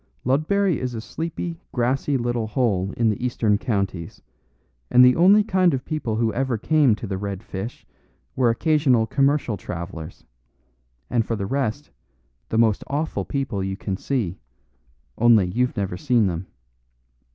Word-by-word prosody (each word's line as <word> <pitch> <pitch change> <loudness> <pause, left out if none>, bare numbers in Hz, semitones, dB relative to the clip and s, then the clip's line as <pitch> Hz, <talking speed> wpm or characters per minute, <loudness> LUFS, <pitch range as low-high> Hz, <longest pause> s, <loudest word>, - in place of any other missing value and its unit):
"Ludbury 160 +7 +1
is 125 -2 -3
a - - -3
sleepy, 165 +6 -5
grassy 130 +3 0
little 120 -2 -1
hole 105 -4 0
in 115 -2 +3
the 105 - -5
Eastern 110 -4 +1
Counties, 100 -7 -3 0.7
and 125 +1 +7
the 125 - +5
only 195 +5 +6
kind 185 -6 +2
of 130 - -6
people 150 -9 -2
who 115 0 0
ever 130 -2 -1
came 145 -1 +3
to 110 - -7
the 95 -2 -4
'Red 100 0 -5
Fish' 100 +5 -7 0.5
were 125 -2 +3
occasional 130 -2 +2
commercial 135 -3 +1
travellers, 85 -3 -7 0.9
and 120 -2 +2
for 115 - -2
the 100 -2 -3
rest, 135 +3 -2 0.6
the 110 - -1
most 110 -3 +3
awful 150 +3 -2
people 135 -9 -2
you 95 0 -3
can 100 -2 -3
see, 105 -4 -2 0.8
only 115 -4 +5
you've 125 +8 -1
never 95 -3 -2
seen 120 -2 +2
them. 90 0 -3
120 Hz, 150 wpm, -23 LUFS, 100-140 Hz, 0.9 s, and